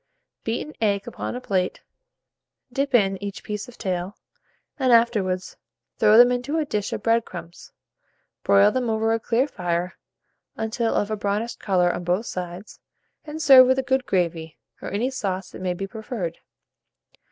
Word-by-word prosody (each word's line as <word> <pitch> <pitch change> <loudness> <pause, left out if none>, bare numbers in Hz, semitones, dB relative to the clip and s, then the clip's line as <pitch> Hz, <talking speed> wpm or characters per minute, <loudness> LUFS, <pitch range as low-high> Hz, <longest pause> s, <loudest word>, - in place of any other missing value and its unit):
Beat 225 +1 -2
an 305 - -11
egg 200 -2 +1
upon 240 - -5
a - - -3
plate; 185 -6 -1 0.9
dip 275 0 0
in 195 -4 +2
each 200 -1 -6
piece 210 +3 -5
of 245 - -14
tail, 185 -1 -3 0.6
and, 260 -2 +2
afterwards, 210 -6 +2 0.4
throw 215 +1 +6
them 245 +1 +8
into 250 +5 -1
a 315 - 0
dish 210 -7 -2
of - - -4
bread 230 0 +3
crumbs; 175 -3 -10 0.7
broil 200 +1 +5
them 250 0 -1
over 225 0 +1
a 225 - 0
clear 245 +4 +1
fire, 175 -6 -3 0.6
until 225 +1 -1
of 205 +1 0
a - - +1
brownish 210 +3 -2
colour 180 -3 +2
on - - -5
both 180 +6 0
sides, 180 +1 -7 0.5
and 310 +1 -5
serve 265 -3 +9
with 260 +1 +3
a 265 - 0
good 265 -1 0
gravy, 165 -3 -1 0.2
or - - -5
any 230 +7 -1
sauce 195 -7 -3
that - - -10
may 180 -1 -1
be 195 - -4
preferred. 205 -4 -5
210 Hz, 170 wpm, -24 LUFS, 185-245 Hz, 0.9 s, serve